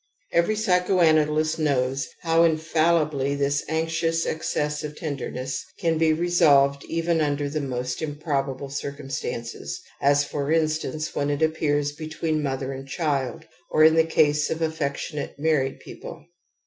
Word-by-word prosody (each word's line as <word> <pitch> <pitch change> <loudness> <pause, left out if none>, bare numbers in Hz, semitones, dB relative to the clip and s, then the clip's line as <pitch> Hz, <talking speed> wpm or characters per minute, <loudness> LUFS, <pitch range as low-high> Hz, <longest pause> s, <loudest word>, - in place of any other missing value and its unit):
Every 170 +6 +2
p^choanalyst 165 -6 +2
knows 135 -3 0 0.2
how 165 0 +3
infallibly 155 -3 +2
this 140 0 0
anxious 165 +1 0
excess^ 150 -1 -2
of 150 0 -6
ten 150 -3 -3
derness 130 0 -4 0.2
can 165 -2 0
be 160 -1 +4
resolved 155 -5 +3
even 165 0 0
under 145 -1 0
the 150 +2 -2
most 125 -1 -3
im 150 -2 -3
probable 140 -3 -2
circumstances, 140 -4 -5 0.2
as 145 +1 +4
for 145 0 -3
instance, 155 -1 0
when 145 0 -1
it 145 +2 0
appears 145 -2 +1
between 155 +1 -3
mother 135 -1 -2
and 135 +1 -8
child, 135 -5 -2 0.2
or 155 - +4
in 160 0 +7
the 160 0 +5
case 150 -2 +2
of 160 - -2
affectionate 150 -1 -3
married 145 -3 0
people. 160 -2 -10
150 Hz, 140 wpm, -24 LUFS, 140-160 Hz, 0.2 s, in